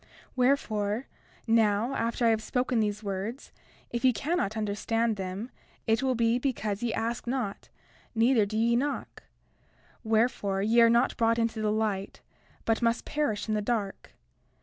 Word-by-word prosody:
32:4 - - -28 0.3
Wherefore, 240 -4 +1 0.4
now 225 +1 +2
after 235 0 0
I - - +6
have 220 -1 +1
spoken 250 +1 0
these 210 0 -1
words, 200 +6 -4 0.4
if 240 +1 -3
ye 260 - +6
cannot 240 - -1
understand 220 +2 0
them 195 +5 -5 0.3
it 225 -1 +2
will 260 -1 +1
be 230 +1 +2
because 220 -6 -2
ye 240 -1 0
ask 230 +2 -3
not, 240 -5 -3 0.5
neither 225 -2 +4
do 215 +2 -3
ye 235 +1 +3
knock; 280 +4 -2 0.8
wherefore, 220 -3 +1
ye 230 +3 +4
are 230 - +7
not 235 +3 +3
brought 230 0 +2
into 230 -1 0
the 210 -1 +1
light, 210 -3 -2 0.4
but 225 +1 +1
must 230 -1 +1
perish 290 -10 -1
in 215 - 0
the 210 - 0
dark. 205 -3 -3
225 Hz, 160 wpm, -28 LUFS, 210-240 Hz, 0.8 s, are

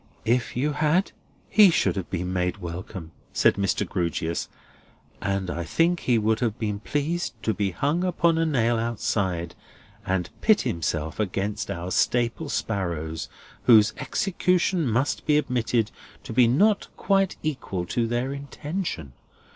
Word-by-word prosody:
"If 120 +1 +1
you 145 +4 +1
had, 155 +6 +1 0.4
he 210 -2 +7
should 170 - +2
have 95 -3 -4
been 90 0 -2
made 90 +1 0
welcome," 85 -1 -7 0.2
said - - +4
Mr. 100 0 0
Grewgious, 85 -2 -2 0.7
"and 100 -2 -1
I 85 - -3
think 165 - +2
he 120 -2 +2
would 110 +1 +1
have 115 -3 -1
been 105 -2 -2
pleased 150 +9 -2
to 110 - +1
be 100 -2 0
hung 145 - 0
upon 170 -2 +2
a 165 - +2
nail 120 -6 +2
outside 95 -7 -1 0.5
and 95 -2 -1
pit 215 -1 +5
himself 80 -1 -2
against 100 +1 -2
our 85 +2 -4
Staple 120 +9 +1
sparrows; 85 - -2 0.4
whose 110 -2 +6
execution 180 -3 +1
must 130 +7 0
be 150 -1 +5
admitted 120 -5 0 0.3
to - - -7
be 120 0 +5
not 200 - +3
quite 195 -1 +2
equal 130 - -3
to 115 +6 0
their 120 +3 -1
intention. 140 - -5
115 Hz, 145 wpm, -25 LUFS, 95-150 Hz, 0.7 s, he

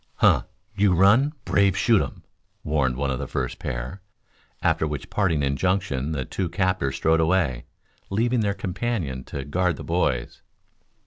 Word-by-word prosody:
"Huh! - - +4 0.3
You 100 -3 +3
run, 115 - +5
brave 100 -2 +3
shoot 115 -4 +4
um!" - - -6 0.4
warned 65 -5 +1
one 70 0 -1
of 65 - -2
the - - -4
first - - -3
pair, 65 +9 -5 0.6
after 80 - +2
which 75 -3 -5
parting 85 -8 +1
injunction 70 -1 0
the 65 -4 -2
two 95 -3 -3
captors 90 -6 0
strode 80 0 +2
away, 80 -7 +1 0.4
leaving 120 +5 +1
their 100 -2 0
companion 90 - -3
to 70 -2 -6
guard 90 +3 0
the - - -8
boys. 75 -8 -1
85 Hz, 150 wpm, -24 LUFS, 70-100 Hz, 0.6 s, run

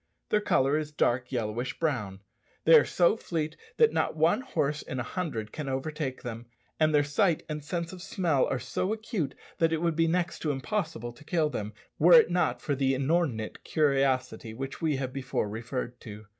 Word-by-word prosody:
Their 210 - +2
colour 140 -5 +2
is 150 -1 -5
dark 125 -3 0
yellowish 120 0 -2
brown. 105 -12 -2 0.4
They 165 - +6
are 155 -2 +8
so 175 +3 +3
fleet 160 -7 -3 0.2
that 460 -1 +5
not - - 0
one 160 +10 +3
horse 150 - -1
in 130 - -5
a - - -1
hundred 115 - -4
can 150 -3 -5
overtake 135 0 -3
them; 120 -1 -6 0.3
and 155 0 +4
their 145 -1 +4
sight 155 +4 +1
and 150 -1 -5
sense 170 +3 -3
of 180 - -9
smell 170 -8 +1
are - - -1
so 130 - -2
acute 215 - -3 0.2
that 165 -1 +3
it 165 - +1
would 170 -1 0
be 165 +1 +3
next 170 +1 0
to 155 - -2
impossible 145 - -2
to 150 - -16
kill 155 -2 +1
them, 105 -3 -4 0.3
were 175 +4 +7
it 235 -7 +8
not 125 -9 +1
for 145 - 0
the 135 -1 +1
inordinate 135 -5 -1
curiosity 135 -6 +1
which 135 +2 -6
we 155 -3 +1
have 130 -1 -3
before 130 -5 -2
referred 120 +3 -5
to. 105 -1 -9
145 Hz, 195 wpm, -28 LUFS, 125-165 Hz, 0.4 s, are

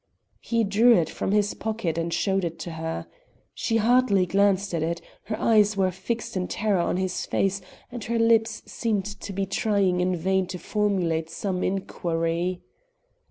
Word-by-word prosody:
He 230 -1 0
drew 220 +4 +5
it 165 -3 +1
from - - -2
his 205 0 +2
pocket 215 -7 -2
and 165 0 -2
showed 190 +3 +1
it 170 -1 -3
to 170 - -5
her. 160 0 -4 0.5
She 225 - 0
hardly 225 -4 +3
glanced 195 +1 +2
at 165 - 0
it; 170 +2 -1 0.3
her 215 -1 -4
eyes 215 -2 +4
were 190 -1 +2
fixed 210 +6 -4
in 180 -1 -1
terror 210 -3 0
on 170 - 0
his 185 -1 -2
face 195 0 0 0.3
and 240 -3 -6
her 235 +1 -1
lips 230 -1 +2
seemed 215 -5 -1
to 205 0 -7
be 195 0 -1
trying 195 -2 +1
in 180 0 +1
vain 190 +2 0
to 185 - -5
formulate 180 -6 0
some 185 +2 -3
inquiry. 175 -1 -1
195 Hz, 170 wpm, -25 LUFS, 180-215 Hz, 0.5 s, drew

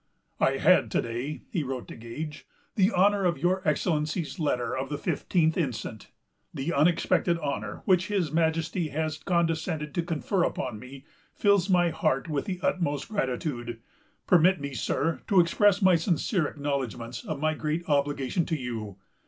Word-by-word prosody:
"I - - +2
had, - - +4
to - - +3
day," 120 +6 -4
he 175 - 0
wrote 130 -3 -4
to - - -8
Gage, 150 +7 -7 0.3
"the 195 -1 +3
honor 200 +1 +3
of 175 -2 +1
your 185 +2 +1
Excellency's 155 +3 0
letter 125 -6 0
of 130 +1 -3
the 145 - -2
fifteenth 160 0 +1
instant. 125 - -3 0.4
The 145 +5 -3
unexpected 170 +2 +2
honor, 140 -10 -4
which 185 -2 +3
his 190 -8 0
Majesty 165 +1 0
has 155 +2 -2
condescended 165 -3 -1
to 175 - 0
confer 170 +3 -1
upon 120 -5 -2
me, 135 +3 -11 0.3
fills 200 -2 +3
my 175 -2 +4
heart 135 -2 0
with 150 -3 -2
the 185 -2 -4
utmost 150 -3 -1
gratitude. 125 - -3 0.5
Permit 180 +1 +5
me, 140 -1 -5
sir, 160 +5 -1
to 195 -4 +4
express 195 +4 +4
my 185 -2 +6
sincere 170 0 +1
acknowledgments 130 -5 -4
of 155 -3 -4
my 155 +1 +1
great 155 +3 -3
obligation 145 +2 +1
to 160 - 0
you.... 110 -6 -5
155 Hz, 160 wpm, -27 LUFS, 135-175 Hz, 0.5 s, my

